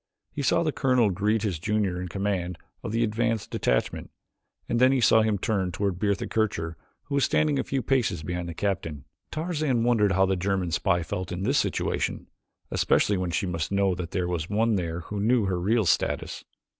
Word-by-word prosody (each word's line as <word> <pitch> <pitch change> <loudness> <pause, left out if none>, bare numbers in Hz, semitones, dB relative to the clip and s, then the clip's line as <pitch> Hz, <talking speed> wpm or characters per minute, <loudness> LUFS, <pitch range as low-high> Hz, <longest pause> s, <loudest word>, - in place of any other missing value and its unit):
He 145 - -4
saw 145 +5 +2
the 155 - +1
colonel 125 -7 +2
greet 105 +4 0
his 95 -7 -1
junior 100 -1 0
in 90 - -4
command 95 -2 -2 0.2
of - - -5
the 115 +1 +1
advance 115 -1 0
detachment, - - -1 0.6
and 120 - 0
then 130 +1 +6
he 135 - +2
saw 110 -1 +5
him 110 -2 +1
turn 100 -3 -1
toward 95 0 -2
Bertha 100 -1 0
Kircher 85 -7 -1 0.3
who 145 - -8
was 140 -1 +2
standing 150 -3 +2
a - - +1
few 135 -2 -2
paces 115 - 0
behind 90 +1 -3
the 85 - -7
captain. 80 -8 -3 0.2
Tarzan 155 -7 -1
wondered 110 -5 +3
how 95 +1 +4
the 95 0 +1
German 95 -1 -1
spy 85 +1 +1
felt 90 +2 -4
in 90 +2 -3
this - - +2
situation, - - -1 0.5
especially 100 - +2
when 90 -1 -1
she 85 - -1
must 85 -2 -3
know 100 -1 +2
that 90 -1 -5
there 90 -1 -1
was 85 -2 -3
one 110 +3 +2
there 85 -3 -2
who 105 +5 -5
knew 115 +1 +3
her 95 -2 -1
real 110 +4 +2
status. - - 0
100 Hz, 200 wpm, -26 LUFS, 90-115 Hz, 0.6 s, then